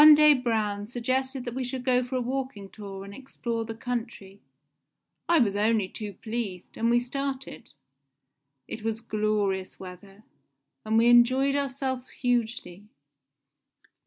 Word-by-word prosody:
One 305 Hz, 0 st, +11 dB
day 300 Hz, 0 st, +7 dB
Braun 215 Hz, -5 st, -1 dB
suggested 255 Hz, +2 st, -1 dB
that 240 Hz, -, -4 dB
we 260 Hz, +1 st, -2 dB
should 250 Hz, 0 st, -4 dB
go 250 Hz, -1 st, +3 dB
for 250 Hz, +2 st, -5 dB
a 255 Hz, -, +1 dB
walking 250 Hz, -5 st, -3 dB
tour 195 Hz, -2 st, -8 dB
and 200 Hz, -, -9 dB
explore 235 Hz, -2 st, -4 dB
the 225 Hz, 0 st, -6 dB
country. 225 Hz, -5 st, -5 dB, 0.9 s
I 340 Hz, -, +6 dB
was 215 Hz, -8 st, +3 dB
only 210 Hz, -1 st, +2 dB
too 210 Hz, +1 st, -6 dB
pleased, 215 Hz, -3 st, -5 dB
and 230 Hz, +1 st, +1 dB
we 240 Hz, 0 st, +5 dB
started. 270 Hz, +2 st, -4 dB, 1.0 s
It 220 Hz, -, -6 dB
was 225 Hz, 0 st, -2 dB
glorious 210 Hz, -4 st, -1 dB
weather, 195 Hz, +2 st, -11 dB, 0.6 s
and 220 Hz, +1 st, +1 dB
we 230 Hz, -, +5 dB
enjoyed 255 Hz, +3 st, +5 dB
ourselves 265 Hz, -2 st, -2 dB
hugely. 230 Hz, -6 st, -2 dB
235 Hz, 140 wpm, -27 LUFS, 210-255 Hz, 1.0 s, One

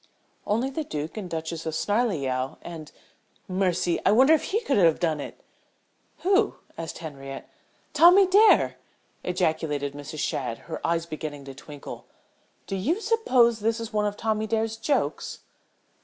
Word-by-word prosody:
"Only 230 Hz, +6 st, 0 dB
the 315 Hz, +3 st, -3 dB
Duke 155 Hz, -, -5 dB
and 205 Hz, -5 st, -5 dB
Duchess 160 Hz, 0 st, -4 dB
of 160 Hz, -, -2 dB
Snarleyow 145 Hz, -, 0 dB
and 160 Hz, -3 st, -8 dB, 0.6 s
mercy! 185 Hz, -2 st, 0 dB
I -, -, +4 dB
wonder 260 Hz, +8 st, +6 dB
if 315 Hz, -, +2 dB
he 435 Hz, +4 st, 0 dB
could 285 Hz, -, 0 dB
have 165 Hz, -5 st, +4 dB
done 160 Hz, -3 st, 0 dB
it!" -, -, -8 dB, 0.8 s
"Who?" 395 Hz, +4 st, +3 dB, 0.2 s
asked 165 Hz, -1 st, -6 dB
Henriette. 135 Hz, -4 st, -8 dB, 0.5 s
"Tommy 360 Hz, +4 st, +7 dB
Dare!" 410 Hz, +4 st, +5 dB, 0.5 s
ejaculated 160 Hz, -5 st, -1 dB
Mrs. 145 Hz, +2 st, -8 dB
Shadd, 125 Hz, -5 st, -2 dB
her 165 Hz, -, -6 dB
eyes 165 Hz, 0 st, 0 dB
beginning 155 Hz, -3 st, -6 dB
to 135 Hz, -, -8 dB
twinkle. 145 Hz, +1 st, -10 dB, 0.6 s
"Do 195 Hz, -, -4 dB
you 295 Hz, -, 0 dB
suppose 255 Hz, -, +3 dB
this 225 Hz, +2 st, 0 dB
is 230 Hz, -1 st, -6 dB
one 210 Hz, -1 st, +1 dB
of 205 Hz, 0 st, -4 dB
Tommy 220 Hz, -1 st, -1 dB
Dare's 225 Hz, 0 st, 0 dB
jokes?" 275 Hz, +6 st, -1 dB
185 Hz, 150 wpm, -26 LUFS, 155-235 Hz, 0.8 s, Tommy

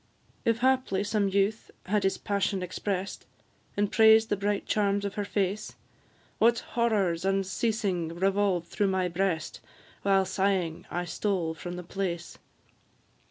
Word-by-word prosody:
If 230 Hz, 0 st, +2 dB
haply 255 Hz, -7 st, +2 dB
some 205 Hz, -1 st, +1 dB
youth 200 Hz, +3 st, 0 dB, 0.2 s
had 210 Hz, +2 st, +1 dB
his 195 Hz, -, +1 dB
passion 200 Hz, -1 st, -1 dB
express'd, 190 Hz, +1 st, -4 dB, 0.5 s
And 205 Hz, 0 st, +1 dB
praised 220 Hz, 0 st, +6 dB
the -, -, +2 dB
bright 200 Hz, 0 st, -1 dB
charms 200 Hz, -1 st, +1 dB
of 200 Hz, -, -3 dB
her 205 Hz, -, -2 dB
face, 200 Hz, +1 st, -2 dB, 0.6 s
What 235 Hz, +1 st, +5 dB, 0.2 s
horrors 200 Hz, -8 st, +1 dB
unceasing 195 Hz, -1 st, 0 dB
revolved 185 Hz, 0 st, 0 dB
though 205 Hz, -, +4 dB
my 190 Hz, -1 st, +1 dB
breast, 175 Hz, -2 st, -1 dB, 0.4 s
While, 195 Hz, -1 st, +3 dB
sighing, 185 Hz, -3 st, -1 dB
I 175 Hz, 0 st, -2 dB
stole 175 Hz, -2 st, -1 dB
from 175 Hz, +2 st, -7 dB
the 180 Hz, -, -6 dB
place! 180 Hz, -1 st, -4 dB
195 Hz, 135 wpm, -28 LUFS, 185-205 Hz, 0.6 s, praised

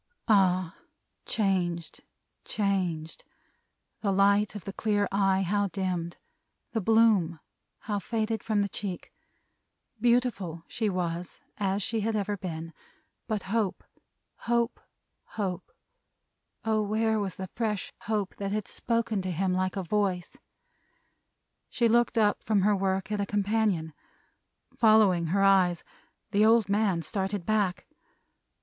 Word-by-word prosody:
Ah! 185 Hz, -4 st, +3 dB, 0.5 s
Changed. 180 Hz, -5 st, -1 dB, 0.4 s
Changed. 180 Hz, -6 st, -2 dB, 0.8 s
The 200 Hz, -, 0 dB
light 200 Hz, +2 st, +3 dB
of 205 Hz, -, -7 dB
the 195 Hz, -, -5 dB
clear 205 Hz, -1 st, +1 dB
eye, 195 Hz, -1 st, +2 dB
how 205 Hz, +2 st, +1 dB
dimmed. 180 Hz, -3 st, -3 dB, 0.5 s
The 225 Hz, -, -1 dB
bloom, 205 Hz, -6 st, +3 dB, 0.4 s
how 205 Hz, -2 st, -2 dB
faded 220 Hz, +2 st, -2 dB
from 210 Hz, -2 st, +1 dB
the -, -, -1 dB
cheek. 195 Hz, -2 st, -6 dB, 0.9 s
Beautiful 235 Hz, -9 st, +1 dB
she 220 Hz, -2 st, -1 dB
was, 175 Hz, -2 st, -3 dB, 0.2 s
as 195 Hz, 0 st, 0 dB
she 225 Hz, +3 st, -1 dB
had 220 Hz, +1 st, -1 dB
ever 205 Hz, 0 st, -1 dB
been, 165 Hz, -3 st, -6 dB, 0.5 s
but 215 Hz, -4 st, -2 dB
Hope, 205 Hz, -1 st, -1 dB, 0.5 s
Hope, 235 Hz, 0 st, 0 dB, 0.6 s
Hope, 190 Hz, -4 st, -3 dB, 0.9 s
oh, 220 Hz, -1 st, +2 dB
where 220 Hz, +1 st, +1 dB
was 195 Hz, -3 st, -3 dB
the 190 Hz, -1 st, -7 dB
fresh 215 Hz, -4 st, -2 dB
Hope 210 Hz, -3 st, -1 dB
that 200 Hz, -1 st, -3 dB
had 210 Hz, -1 st, -2 dB
spoken 230 Hz, -3 st, -1 dB
to 185 Hz, -, -4 dB
him 180 Hz, +2 st, 0 dB
like 185 Hz, 0 st, 0 dB
a 195 Hz, -, -2 dB
voice! 185 Hz, -1 st, -1 dB, 1.3 s
She 235 Hz, -, +2 dB
looked 235 Hz, +1 st, +2 dB
up 210 Hz, -2 st, +2 dB
from 210 Hz, -3 st, +2 dB
her 205 Hz, +2 st, +3 dB
work, 190 Hz, 0 st, -1 dB
at 210 Hz, -1 st, 0 dB
a 200 Hz, -, -2 dB
companion. 205 Hz, -6 st, 0 dB, 0.8 s
Following 215 Hz, -7 st, +4 dB
her 195 Hz, +4 st, +2 dB
eyes, 185 Hz, -3 st, +4 dB, 0.5 s
the 205 Hz, 0 st, +3 dB
old 225 Hz, -2 st, +4 dB
man 200 Hz, -5 st, +1 dB
started 195 Hz, -1 st, -2 dB
back. 205 Hz, -4 st, 0 dB
200 Hz, 130 wpm, -28 LUFS, 185-215 Hz, 1.3 s, Following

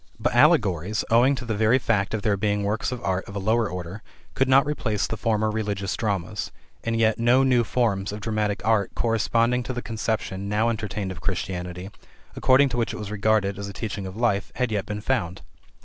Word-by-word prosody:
But -, -, 0 dB
allegories, 95 Hz, +4 st, +3 dB
owing 125 Hz, +5 st, +5 dB
to 125 Hz, -, -6 dB
the 115 Hz, -, -2 dB
very 110 Hz, +4 st, +3 dB
fact 110 Hz, -5 st, 0 dB
of 105 Hz, -, -4 dB
their 105 Hz, -3 st, +2 dB
being 105 Hz, 0 st, 0 dB
works 105 Hz, +5 st, -1 dB
of 125 Hz, -1 st, -5 dB
art 95 Hz, -1 st, 0 dB
of 100 Hz, -, -10 dB
a -, -, -2 dB
lower 110 Hz, +2 st, +1 dB
order, 90 Hz, +3 st, -6 dB, 0.3 s
could 135 Hz, -, +1 dB
not 135 Hz, +2 st, +6 dB
replace 115 Hz, -8 st, -1 dB
the -, -, -3 dB
former 110 Hz, -1 st, 0 dB
religious 100 Hz, -3 st, -2 dB
dramas, 100 Hz, -1 st, -2 dB, 0.3 s
and 115 Hz, 0 st, -1 dB
yet 110 Hz, 0 st, +2 dB
no 120 Hz, +3 st, +4 dB
new 125 Hz, -3 st, +3 dB
forms 105 Hz, -5 st, 0 dB
of 105 Hz, -, -6 dB
dramatic 105 Hz, -2 st, -2 dB
art 110 Hz, -3 st, +1 dB
corresponding 115 Hz, +2 st, +1 dB
to 125 Hz, +1 st, -4 dB
the 120 Hz, -, -4 dB
conception 105 Hz, -3 st, -3 dB
now 110 Hz, +3 st, +2 dB
entertained 105 Hz, -3 st, -3 dB
of 85 Hz, -2 st, -8 dB
Christianity, 90 Hz, 0 st, -4 dB, 0.4 s
according 135 Hz, +2 st, +4 dB
to 120 Hz, -, -3 dB
which 115 Hz, -, 0 dB
it -, -, -5 dB
was 105 Hz, -1 st, -6 dB
regarded 105 Hz, -2 st, +1 dB
as 100 Hz, -, -4 dB
a 100 Hz, -, -7 dB
teaching 100 Hz, -1 st, -5 dB
of 95 Hz, +2 st, -8 dB
life, 115 Hz, -4 st, 0 dB
had 125 Hz, -3 st, -1 dB
yet 105 Hz, -2 st, -2 dB
been 105 Hz, 0 st, -4 dB
found. 100 Hz, -7 st, -2 dB
105 Hz, 210 wpm, -24 LUFS, 100-115 Hz, 0.4 s, not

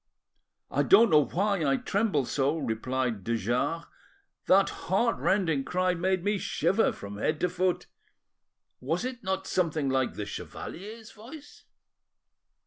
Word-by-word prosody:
"I -, -, +1 dB
don't 235 Hz, -, +6 dB
know 150 Hz, -2 st, +6 dB
why 200 Hz, -1 st, 0 dB
I 135 Hz, -2 st, +2 dB
tremble 195 Hz, -, 0 dB
so," 140 Hz, +5 st, 0 dB
replied 120 Hz, -, -2 dB
de 115 Hz, +3 st, 0 dB
Jars; 125 Hz, -, -1 dB, 0.6 s
"that 195 Hz, +1 st, +5 dB, 0.2 s
heart 230 Hz, +5 st, +2 dB
rending 165 Hz, -8 st, +1 dB
cry 185 Hz, +3 st, 0 dB
made 185 Hz, +1 st, 0 dB
me 205 Hz, 0 st, 0 dB
shiver 210 Hz, +4 st, +1 dB
from 100 Hz, 0 st, -8 dB
head 155 Hz, +6 st, 0 dB
to 180 Hz, -, +2 dB
foot. 180 Hz, 0 st, 0 dB, 0.9 s
Was 165 Hz, -, -2 dB
it 255 Hz, -3 st, -5 dB
not 190 Hz, 0 st, -2 dB
something 160 Hz, -7 st, 0 dB
like 130 Hz, -1 st, 0 dB
the 105 Hz, -, -4 dB
chevalier's 215 Hz, -, -8 dB
voice?" 275 Hz, +7 st, -13 dB
175 Hz, 135 wpm, -28 LUFS, 135-200 Hz, 0.9 s, don't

